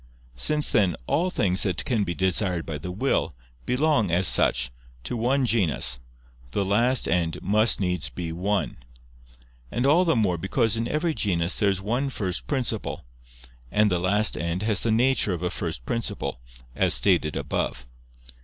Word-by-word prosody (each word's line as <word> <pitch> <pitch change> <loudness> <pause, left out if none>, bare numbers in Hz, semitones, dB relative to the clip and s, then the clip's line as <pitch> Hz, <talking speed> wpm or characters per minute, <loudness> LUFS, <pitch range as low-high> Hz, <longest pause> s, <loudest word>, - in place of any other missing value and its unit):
Since, 150 - +2
then, 95 -6 +3
all 175 - +1
things 95 - 0
that 95 -4 0
can 115 -5 +1
be 85 -3 -3
desired 95 -2 +1
by 75 -3 -5
the 90 - -6
will, 130 +9 0 0.4
belong, 135 - +2
as 90 +2 +3
such, - - +2 0.3
to 95 - -4
one 130 +4 +1
genus, 95 - +2 0.5
the 100 - 0
last 120 +6 +2
end 85 -1 0
must 110 +3 +2
needs 90 -8 -1
be 85 +2 -5
one. 100 +5 -2 0.9
And 125 - -1
all 155 +6 +5
the 165 -5 +2
more 95 -7 +1
because 115 +5 +1
in 115 +1 -1
every 160 +2 0
genus 90 - 0
there 105 -2 +3
is 95 -1 -2
one 125 +7 -1
first 95 -8 -4
principle; 125 - -2 0.7
and 105 -1 +3
the 90 - +1
last 100 +4 +2
end 85 +4 -2
has 105 -3 +1
the 115 - +1
nature 120 -3 +2
of 90 0 -5
a 90 - -1
first - - -5
principle, 115 - -3 0.4
as - - +2
stated 85 -6 +2
above. - - -3
100 Hz, 165 wpm, -25 LUFS, 90-120 Hz, 0.9 s, all